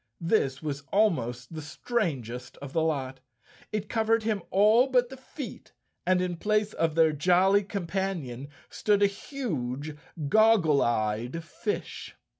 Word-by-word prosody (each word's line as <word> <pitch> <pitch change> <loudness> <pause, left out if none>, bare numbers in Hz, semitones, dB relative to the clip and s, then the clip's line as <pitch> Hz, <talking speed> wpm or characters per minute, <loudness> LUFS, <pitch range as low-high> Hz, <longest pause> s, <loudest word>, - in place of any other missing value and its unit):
This 160 -6 0
was 145 -2 -3
almost 125 - +1
the 155 - -5
strangest 145 - -3
of 140 -1 -9
the 165 - +2
lot. 135 -5 -1 0.5
It 210 -1 -2
covered 225 0 +1
him 215 -3 0
all 215 +6 +5
but 250 -2 +2
the 265 - -9
feet, 260 -2 -9 0.3
and 185 0 +4
in 175 -2 -3
place 210 +2 0
of 160 -1 0
their 160 -1 +5
jolly 185 +6 +3
companion 175 - -3 0.2
stood 205 -1 +1
a - - +8
huge 155 - -4 0.3
goggle 200 -6 +5
eyed 115 +7 -1
fish. 205 +5 -5
175 Hz, 135 wpm, -28 LUFS, 140-215 Hz, 0.5 s, a